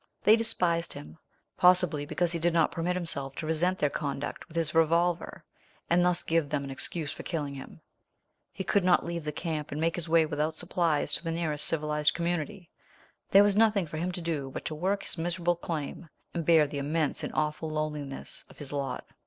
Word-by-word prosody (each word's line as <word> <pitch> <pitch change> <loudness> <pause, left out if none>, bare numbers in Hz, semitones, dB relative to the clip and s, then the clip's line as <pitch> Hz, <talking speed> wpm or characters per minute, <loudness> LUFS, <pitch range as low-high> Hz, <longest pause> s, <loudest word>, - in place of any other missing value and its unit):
They 215 - +7
despised 180 -7 0
him, 75 +2 -10 0.4
possibly 180 -5 +4
because 175 +2 0
he 170 - -1
did 170 +1 +2
not 165 -2 +4
permit 175 +2 -1
himself 140 -6 -3
to 155 - -5
resent 170 +4 +1
their 145 -4 +1
conduct 140 -1 -4
with 170 -1 -9
his 160 -2 0
revolver, 165 +2 +1 0.5
and 175 +1 +5
thus 180 -1 +3
give 165 -3 +1
them 145 -1 -1
an 140 - -6
excuse 140 +3 -1
for - - -7
killing 150 -5 -3
him. 135 - -10 0.7
He 190 - -5
could 200 0 +2
not 180 -1 +4
leave 170 -1 -3
the 150 - -2
camp 155 -1 -4
and 145 - -3
make 165 +1 +1
his 170 -2 -3
way 165 -1 +5
without 155 +1 -1
supplies 170 -4 0
to - - +1
the 165 - -3
nearest 160 -3 0
civilized 150 -1 +1
community. 175 +2 -3 0.6
There 200 +1 +8
was 205 -1 +3
nothing 210 -3 +4
for 155 0 -7
him 175 +3 -1
to 175 - -4
do 155 -5 -2
but - - -7
to - - -2
work 190 +6 -1
his - - -4
miserable 175 +1 0
claim, 165 -1 -5 0.2
and 170 -3 -3
bear 160 -3 +6
the 145 0 -4
immense 150 +1 -1
and - - -3
awful 155 +1 -1
loneliness 150 -3 -4
of - - -16
his 145 -1 -7
lot. 140 -1 -3
165 Hz, 205 wpm, -29 LUFS, 150-175 Hz, 0.7 s, There